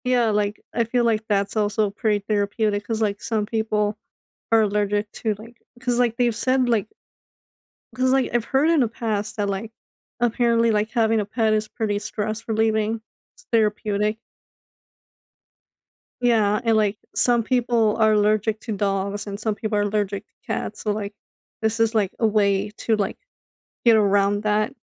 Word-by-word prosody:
Yeah. 245 -2 +3
Like, 210 0 -1
I 235 - +2
feel 240 +2 0
like 220 -1 +1
that's 200 -1 0
also 210 0 +1
pretty 210 0 0
therapeutic 205 0 0
'cause, 225 -1 -2
like, 205 -2 -1
some 220 -2 -1
people 215 -1 -1 0.5
are 225 -1 +5
allergic 205 0 0
to, 220 -2 -2
like 230 +3 -14 0.2
'cause, 245 -1 0
like, 235 -2 +1
they've 240 -3 +2
said, 255 +2 +2
like 215 -4 +1 1.1
'cause, 255 0 +2
like, 265 -1 +1
I've 240 -2 +1
heard 275 +5 +2
in 330 -4 +4
the 240 - +3
past 215 -2 -3
that, 205 -1 0
like, 200 +3 -4 0.5
apparently, 235 -1 +2
like, 215 +1 0
having 225 -2 +2
a 210 - -1
pet 220 +1 +1
is 215 0 0
pretty 210 -2 -2
stress 215 +1 -4
relieving. 220 0 +1 0.3
It's - - -22
therapeutic. 210 -1 +1 2.0
Yeah. 220 -3 +3
And, 225 -2 +3
like, 210 -1 +1 0.2
some 240 -1 +4
people 235 -3 +2
are 220 -1 +4
allergic 215 +1 +2
to 230 - -6
dogs 200 +1 -1
and 200 -1 -6
some 215 -1 -1
people 215 0 -3
are - - +2
allergic 205 -1 -1
to - - -47
cats. 210 - -4
So, 210 - -1
like, 205 -1 -4 0.5
this 220 +1 0
is, 225 0 +2
like, 205 -4 +2
a 225 - +3
way 205 -1 +2
to, 225 - +1
like, 205 -2 -2 0.7
get 230 -2 +6
around 205 -1 +2
that. 215 +4 +1
215 Hz, 170 wpm, -23 LUFS, 205-230 Hz, 2.0 s, get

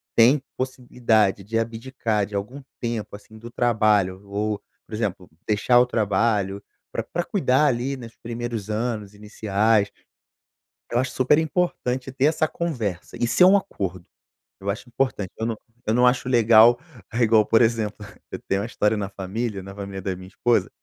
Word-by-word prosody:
tem 130 +5 +6 0.2
possibilidade 120 -6 +1
de 115 +4 -2
abdicar 115 -2 -2
de 100 - -9
algum 105 +8 -4 0.2
tempo, 115 -4 -3
assim, 110 +2 -14
do 115 +2 -10
trabalho 105 -6 +2
ou, 105 +1 -2 0.3
por - - -14
exemplo, 100 -5 -3 0.2
deixar 110 +4 +4
o 125 - +5
trabalho, 105 -3 0 0.3
pra - - -2
pra 175 - -3
cuidar 150 - +2
ali, 130 +1 0
nos 115 -3 -10
primeiros 115 -3 -5
anos 110 -2 -2
iniciais", 105 0 +1 1.0
eu 120 - +2
acho 130 0 -2
super 130 +3 +3
importante 145 -6 -1
ter 135 +1 +2
essa 155 0 +2
conversa, 120 - -4
isso 120 +8 +3
é - - +10
um 195 +2 +7
acordo. 95 - -4 0.6
Eu 100 - -3
acho 110 +5 -4
importante, 120 -6 -1
eu 110 - -2
não 115 -1 -1 0.3
eu 110 - +2
não 125 +2 +4
acho 125 0 +2
legal, 115 -1 +6 0.4
igual 115 -2 +4
por 115 - +4
exemplo, 110 -2 0 0.3
eu - - -5
tenho 95 0 +1
uma 105 - -3
história 105 -2 +1
na 100 -2 -3
família, 100 +2 -4
na 100 +1 -9
família 100 -1 -6
da 95 0 -2
minha 95 0 -11
esposa, 120 +5 +1
115 Hz, 165 wpm, -24 LUFS, 100-125 Hz, 1.0 s, é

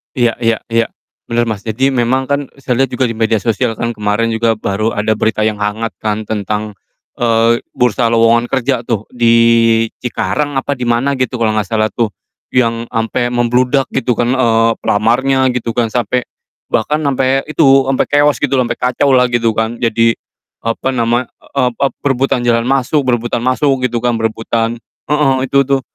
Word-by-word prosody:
Iya 120 -2 +2
iya 115 -2 +1
iya 115 0 +2 0.4
bener, 120 0 +1
Mas. 110 -3 -3
Jadi 130 +5 +1
memang 130 +1 +1
kan 140 -1 -1
saya 130 -3 -2
lihat 135 -1 +2
juga 130 - 0
di 120 - 0
media 110 0 +1
sosial 115 +1 -1
kan 115 +2 -2
kemarin 105 +1 -1
juga 115 0 +1
baru 110 +1 -2
ada 105 +1 0
berita 110 0 0
yang 110 -1 -1
hangat 105 +2 -2
kan 110 0 -2
tentang, 105 0 -3 0.5
eee, 115 0 +3 0.2
bursa 125 0 +1
lowongan 115 +1 +3
kerja 130 -1 0
tuh 110 -3 -1
di 120 -2 +2 0.7
Cikarang 145 +4 -2
apa 135 +1 -1
di 125 - -3
mana 130 +3 0
gitu 130 0 -1
kalau 115 -2 +1
nggak 105 -3 -1
salah 110 -1 0
tuh, 110 -4 -1 0.4
yang 115 -2 +1
sampai 115 +1 -1
membludak 125 +3 +1
gitu 130 -2 0
kan, 120 +2 0
eee, 115 -2 +3
pelamarnya 130 +5 +2
gitu 120 -2 -3
kan 120 -2 +1
sampai 125 +1 0 0.5
bahkan 150 +8 0
sampai 135 -1 +1
itu, 135 -3 +4
sampai 135 - +1
keos 145 0 +3
gitulah, 135 -3 +1
sampai 120 - -4
kacaulah 125 0 +2
gitu 120 -2 +1
kan. 110 +1 -2
Jadi 115 0 +2 0.5
apa 115 +3 -1
nama, 120 0 +1 0.4
ep 125 -2 +2
ep 140 -1 0
berebutan 135 -2 +1
jalan 115 -1 +2
masuk, 135 +3 +1
berebutan 120 -2 0
masuk 130 +1 +1
gitu 120 -1 -1
kan, 120 0 +1
berebutan 115 +1 -2 0.3
heeh, 150 -3 +2
itu 140 +1 +3
tuh, 135 0 +1
120 Hz, 175 wpm, -15 LUFS, 115-130 Hz, 0.7 s, itu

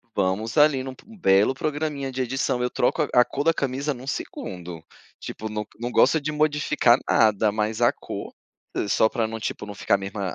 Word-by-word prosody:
vamos 100 +6 -1
ali 145 -3 +5
num 130 0 -6
p - - -20
belo 100 - +4
programinha 145 -2 -3
de 130 0 -3
edição, 130 0 -1
eu 125 - 0
troco 150 +6 +1
a 125 0 +6
cor 140 - -3
da 165 - +4
camisa 140 +1 -2
num 130 +1 -11
segundo. 90 - -6 0.4
Tipo, 110 - -6
não 105 0 -4
não 120 +1 -3
gosto 135 +6 +4
de 155 +2 -2
modificar 150 -5 +3
nada, 110 -2 +3
mas 110 +2 -2
a 120 - +5
cor, - - -7 0.6
só 110 +2 +3
pra 115 -2 -1
não, 115 0 -6
tipo, 105 - -4
não 105 - -7
ficar 100 +1 +2
a - - +1
mesma 100 +1 -6
120 Hz, 195 wpm, -24 LUFS, 105-140 Hz, 0.6 s, a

